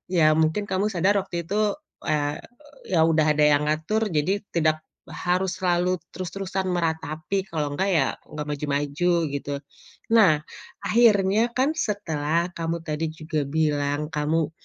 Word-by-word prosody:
ya 155 -2 +5
mungkin 160 +6 +1
kamu 195 +2 +1
sadar 195 +4 +3
waktu 175 -3 -5
itu, 210 +4 +1 0.3
eee, 145 -1 0 0.5
ya 165 - +4
udah 160 -1 +3
ada 150 - +3
yang 150 0 +4
ngatur, 185 +9 0
jadi 180 +6 0
tidak 155 -1 +2 0.3
harus 185 +1 -1
selalu 180 0 +1 0.2
terus-terusan 190 +1 -3
meratapi, 160 +2 -1
kalau 150 -3 -2
nggak 195 +4 0
ya 160 -8 +3 0.2
nggak 150 -1 -5
maju-maju, 145 +4 0 0.2
gitu. 140 0 -4 0.6
Nah, 185 -10 +6 0.5
akhirnya 215 -1 +4
kan 275 +5 +2
setelah 170 - -1
kamu 165 0 -1
tadi 155 +1 -2
juga 155 -1 -3
bilang, 150 -1 0
kamu 155 +1 0
165 Hz, 135 wpm, -25 LUFS, 150-190 Hz, 0.6 s, Nah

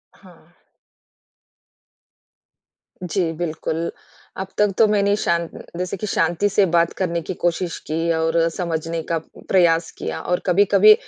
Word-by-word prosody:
हाँ। - - -20 2.5
जी, 175 -1 -1
बिल्कुल। 165 0 -3 0.5
अब 190 - -3
तक 210 -1 +3
तो 220 - +6
मैंने 200 -1 +2
शांत 170 -4 0 0.3
जैसे 180 +2 -3
कि 215 - -4
शांति 175 +2 +1
से 200 0 +3
बात 170 -1 +2
करने 170 -3 -1
की 185 - -5
कोशिश 175 0 0
की 165 +2 0
और 165 +1 0 0.2
समझने 165 -2 -2
का 165 - +2 0.3
प्रयास 170 -3 +3
किया - - -4
और 180 0 0
कभी-कभी 200 +3 +6
175 Hz, 130 wpm, -21 LUFS, 165-195 Hz, 2.5 s, तो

